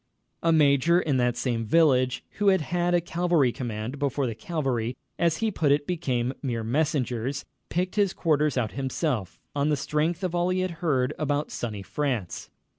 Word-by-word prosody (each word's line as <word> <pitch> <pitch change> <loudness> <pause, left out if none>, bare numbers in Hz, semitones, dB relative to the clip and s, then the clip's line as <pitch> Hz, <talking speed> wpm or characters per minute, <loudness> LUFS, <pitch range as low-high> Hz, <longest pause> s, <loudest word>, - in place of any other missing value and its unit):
A 165 - +3
major 155 +2 +4
in 145 -6 0
that 120 -1 +1
same 120 -2 -1
village 130 -1 +3 0.2
who 205 - +2
had 190 -3 +5
had 175 +2 0
a 175 - +3
cavalry 170 -6 +2
command 120 +2 -5
before 140 -1 0
the 115 - -2
cavalry, 125 -2 -2 0.2
as 165 -2 +2
he 220 - +1
put 155 -7 +1
it, 145 0 +2
became 130 -8 -1
"mere 120 -5 -2
messengers," 135 0 -1 0.2
picked 180 +4 -2
his 200 -3 +3
quarters 150 -4 +1
out 115 -4 0
himself, 130 - -2 0.2
on 145 +1 +1
the 150 - +2
strength 155 +6 -1
of 180 -2 -1
all 175 +1 +1
he 185 0 +1
had 185 -1 -1
heard 135 -5 +1
about 145 -1 -1
"Sunny 105 -4 -4
France." 115 - -3
145 Hz, 180 wpm, -26 LUFS, 125-165 Hz, 0.2 s, had